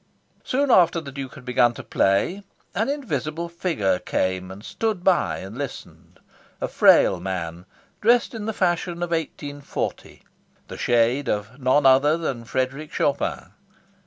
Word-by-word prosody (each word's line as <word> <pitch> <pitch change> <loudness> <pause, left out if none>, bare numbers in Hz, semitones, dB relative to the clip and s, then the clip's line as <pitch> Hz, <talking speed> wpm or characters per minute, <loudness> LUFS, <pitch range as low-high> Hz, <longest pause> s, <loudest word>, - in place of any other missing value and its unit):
Soon 275 +1 +1
after 175 -5 +5
the 140 -4 -8
Duke 135 0 -7
had 135 -3 -13
begun 125 -1 +3
to - - -8
play, 100 - +1 0.3
an 220 +5 0
invisible 170 - -3
figure 165 - -1
came 95 0 -1
and 95 +3 -10
stood 215 -5 -2
by 185 -2 +2
and 95 +3 -8
listened; 140 0 -8 0.4
a - - -2
frail - - +5
man, 90 -1 -5 0.3
dressed 235 +3 +3
in 220 -2 -5
the - - 0
fashion 175 -3 -1
of 175 - -4
1840; 145 -3 -4 0.5
the - - -7
shade 120 +3 +2
of 105 +5 -3
none 135 +2 +3
other 135 +4 +5
than 130 -8 -4
Frederic 130 +5 -2
Chopin. 140 - -1
140 Hz, 145 wpm, -23 LUFS, 115-175 Hz, 0.5 s, after